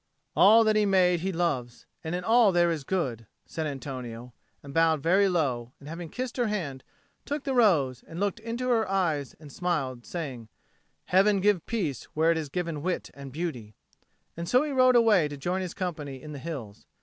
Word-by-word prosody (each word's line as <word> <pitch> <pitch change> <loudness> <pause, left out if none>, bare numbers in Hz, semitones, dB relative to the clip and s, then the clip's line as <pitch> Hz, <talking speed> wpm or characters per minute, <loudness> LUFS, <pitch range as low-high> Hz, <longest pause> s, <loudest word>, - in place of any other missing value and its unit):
"All 220 +4 +7
that 215 -1 +2
He 215 - +4
made 180 -2 +3
He 190 +3 -2
loves, 145 -9 -2 0.2
and 160 +2 -3
in 180 - -3
all 225 0 +5
there 175 -1 +3
is 155 -4 -3
good," 130 - -2 0.2
said 160 -1 -4
Antonio, 125 -4 -7 0.3
and 140 - -9
he - - -12
bowed 160 -2 +3
very 190 +4 +4
low, 130 -9 -1
and, 145 - -13
having 165 +1 -7
kissed 255 +4 -5
her 240 -2 +1
hand, 155 -11 -3 0.4
took 290 0 -4
the 270 - -2
rose; 155 - +3
and 165 - -9
he - - -4
looked 205 +2 -1
into 235 +3 -3
her 225 -4 +2
eyes 160 -8 0
and 150 -2 -12
smiled, 135 -8 -2
saying, 135 -10 -5 0.6
"Heaven 195 +2 +4
give 200 -3 +2
peace 170 - -2
where 160 +2 +3
it 165 - +1
has 155 -3 -4
given 165 -2 -3
wit 180 +3 -3
and 140 -1 -9
beauty;" 125 - -5 0.6
and 170 0 -5
so 255 +3 +4
he 305 - -3
rode 255 -2 +5
away 220 -9 +5
to 145 -1 -7
join 180 +7 -2
his 180 -2 -5
company 150 -7 -4
in 155 +2 -10
the 145 - -7
hills. 130 -10 -7
170 Hz, 205 wpm, -27 LUFS, 140-195 Hz, 0.6 s, All